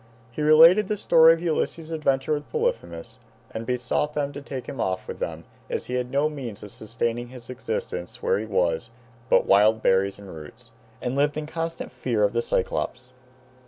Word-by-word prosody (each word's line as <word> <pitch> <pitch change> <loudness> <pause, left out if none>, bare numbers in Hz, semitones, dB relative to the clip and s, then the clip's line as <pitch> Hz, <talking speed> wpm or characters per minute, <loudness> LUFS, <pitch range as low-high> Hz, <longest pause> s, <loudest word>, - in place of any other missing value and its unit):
He 135 - -5
related 165 +7 +7
the 210 - -1
story 165 -4 +6
of 165 - -9
Ulysses's 165 -1 -1
adventure 145 -2 0
with 145 0 -4
Polyphemus, 85 -1 -3 0.3
and 110 +1 -6
besought 125 +4 -1
them 145 -1 -1
to 145 - -7
take 135 -2 -6
him 135 - -5
off 95 0 -2
with - - -7
them - - -4 0.3
as - - -3
he 125 - -6
had 125 -1 -1
no 140 +3 +2
means 130 -10 -7
of 105 - -9
sustaining 120 +2 -3
his 125 0 -11
existence 90 -7 -5
where - - +2
he 110 - -5
was 90 -1 0 0.4
but - - +4
wild 105 +3 +4
berries 95 +1 +2
and 100 -4 -11
roots, 110 +11 -12 0.3
and 125 +1 -2
lived 145 +1 +1
in 155 - -3
constant 165 +1 -4
fear 115 -5 -1
of 105 - +2
the 120 - +1
Cyclopes. 125 +1 -2
125 Hz, 190 wpm, -25 LUFS, 110-150 Hz, 0.4 s, related